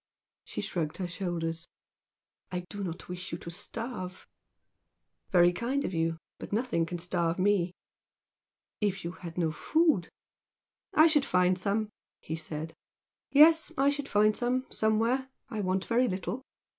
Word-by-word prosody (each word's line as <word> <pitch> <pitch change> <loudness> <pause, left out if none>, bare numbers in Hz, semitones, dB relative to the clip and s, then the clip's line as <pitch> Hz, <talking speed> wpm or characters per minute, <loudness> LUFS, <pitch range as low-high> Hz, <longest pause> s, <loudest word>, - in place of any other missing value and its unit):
She - - -4
shrugged 160 -4 -2
her 185 - -2
shoulders. 170 -2 -3 0.8
"I 180 -1 -2
do 205 -1 -4
not 175 -1 -5
wish 180 0 -6
you 165 - -3
to 170 - -8
starve." 190 -1 -6 1.0
"Very 175 -2 +5
kind 255 +8 -1
of - - -3
you! 165 0 0 0.2
But - - -8
nothing 215 -7 0
can 175 - -4
starve 170 -1 0
me." 185 -2 +2 1.0
"If 205 -3 0
you 170 - -3
had 170 -2 -9
no 165 -3 +1
food 310 - +2 0.4
" - - -54
"I 310 - +8
should 310 -3 +5
find 180 -6 +3
some" 205 +3 0 0.3
he 160 - -4
said 155 0 -5 0.6
"Yes! 320 +4 +6
I 275 +1 +4
should 285 -1 -4
find 210 +1 +4
some, 255 +1 0
somewhere! 230 +5 +1 0.2
I 215 - -2
want 185 0 0
very 245 +2 +3
little." 195 +5 -3
190 Hz, 150 wpm, -30 LUFS, 175-240 Hz, 1.0 s, I